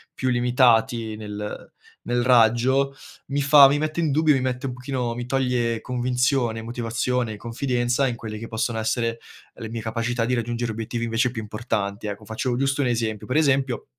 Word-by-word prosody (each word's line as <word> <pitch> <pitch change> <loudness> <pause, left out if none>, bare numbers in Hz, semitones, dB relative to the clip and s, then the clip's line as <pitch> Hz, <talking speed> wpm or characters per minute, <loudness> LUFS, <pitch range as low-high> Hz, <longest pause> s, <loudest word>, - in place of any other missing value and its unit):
più 130 - -1
limitati 120 -2 +2
nel 105 -1 -7 0.3
nel 120 0 0
raggio, 125 +3 +3 0.3
mi 140 +1 -1
fa 140 0 +8
mi 140 +2 +1
mette 155 +2 -2
in 165 -2 +1
dubbio 155 +1 +4
mi 135 - +1
mette 130 0 -2
un 130 - -3
pochino 125 -1 -3
mi 120 +1 -5
toglie 125 -3 0
convinzione, 125 -2 0
motivazione 120 0 -2
e 105 - -8
confidenza, 120 +2 0
in 125 - -2
quelle 110 -2 -7
che 115 - -7
possono 115 0 -2
essere 115 +1 -1 0.4
le 110 - -6
mie 115 0 -5
capacità 115 +1 -1
di 125 - -1
raggiungere 120 -1 -2
obiettivi 115 +2 -4
invece 115 +2 +1
più 115 -3 -5
importanti, 105 -2 -3
ecco. 105 +1 -6
Faccio 115 +3 -2
giusto 135 +1 0
un 130 - +1
esempio, 115 -3 -2
pre 130 - 0
esempio 135 -4 +1
120 Hz, 180 wpm, -24 LUFS, 115-130 Hz, 0.4 s, fa